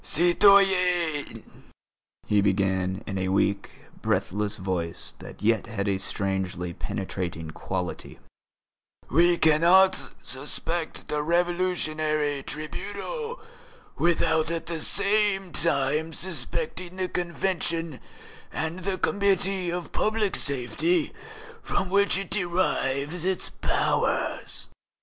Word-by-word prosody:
"Citoyens," 180 -3 +4 0.8
he 105 -1 +3
began, 95 0 0
in 95 -3 -3
a 95 - -1
weak, 100 +1 +1 0.3
breathless 105 +2 -1
voice 90 -4 -2
that - - -11
yet 115 +1 +2
had 105 -3 -3
a 95 -1 0
strangely 95 -3 -2
penetrating 85 -4 -4
quality, 90 +2 -5 0.9
"we 170 +5 +5
cannot 170 +5 +4
suspect 160 +5 -4
the 150 0 -1
Revolutionary 155 -4 0
Tribunal 205 - -5 0.5
without 160 -2 +2
at 165 -1 -3
the 170 -1 -4
same 200 -1 +1
time 155 0 +1
suspecting 175 +2 -3
the 185 -1 -1
Convention 170 -3 -1 0.5
and 160 +3 -3
the 185 +1 -2
Committee 195 -2 +1
of 175 0 -4
Public 215 -2 +1
Safety 140 - 0 0.5
from 190 - -2
which 200 -1 +4
it 195 - -5
derives 170 -5 +1
its 190 0 -1
powers. - - 0
165 Hz, 100 wpm, -26 LUFS, 115-185 Hz, 0.9 s, we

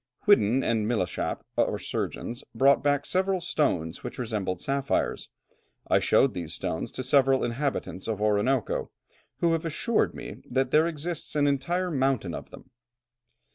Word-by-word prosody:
Whiddon 135 - +4
and 110 -2 +1
Milechappe, 105 -7 -1 0.2
our - - +2
surgeon, - - -3 0.2
brought 135 +4 +5
back 145 0 +1
several 190 0 +1
stones 90 - -1
which - - -6
resembled 105 -7 -2
sapphires. 140 +3 -1 0.6
I - - +4
showed 135 - +3
these 85 -4 -4
stones 80 - -3
to 130 - -3
several 135 0 +4
inhabitants 120 -6 -2
of 110 -3 -2
Orinoco, 105 +4 +1 0.5
who 170 - +3
have 165 - -1
assured 170 +8 0
me - - -7
that 130 +1 0
there 155 +2 +5
exists 165 0 -4
an 145 -1 +3
entire 175 +6 0
mountain 130 - 0
of - - -7
them." 130 - -14
135 Hz, 145 wpm, -27 LUFS, 110-150 Hz, 0.6 s, brought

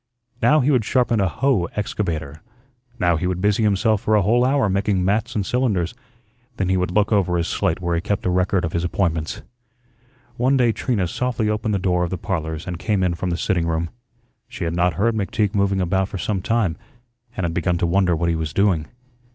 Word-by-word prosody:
Now 150 0 +4
he 140 +4 +2
would 125 -5 +3
sharpen 120 -1 +1
a 95 - +2
"hoe" 130 -3 +1
excavator, 80 -8 -3 0.6
now 85 -7 +2
he 90 +3 -1
would 90 -1 -2
busy 105 +3 +2
himself 105 0 +2
for 110 - +2
a 105 - +3
whole 120 +5 +3
hour 135 -2 +2
making 95 -1 0
"mats" 110 +5 0
and 100 -3 0
"cylinders." 105 -8 0 0.6
Then 95 -2 -1
he 95 - +2
would 90 -1 0
look 105 +4 +1
over 95 -4 +2
his 85 0 -1
slate 80 - 0
where 85 -1 -2
he 85 - 0
kept 100 +2 -2
a 90 - +2
record 90 0 +1
of 80 - -5
his 85 - -1
appointments. 85 -3 -1 0.9
One 130 +3 +2
day 120 -3 +3
Trina 110 -5 -1
softly 120 +3 -1
opened 105 0 -1
the - - +2
door 90 -2 +1
of 85 - -1
the 95 - -3
"Parlors" 80 -5 -3
and 90 -1 -5
came 100 -1 0
in 90 -1 +1
from 90 +2 -3
the 85 - -1
sitting 85 -3 0
room. 85 0 -1 0.6
She - - -7
had 85 0 -1
not 90 -1 +1
heard 115 +6 +1
McTeague 105 0 -1
moving 100 -1 +1
about 95 +1 0
for - - -5
some 95 0 -2
time 100 -5 0 0.6
and 95 - -2
had 85 -1 -1
begun 90 +1 0
to 85 - 0
wonder 90 0 +2
what 85 +2 0
he 85 - +1
was 80 -2 -3
doing. 95 -6 +2
95 Hz, 220 wpm, -21 LUFS, 85-105 Hz, 0.9 s, Now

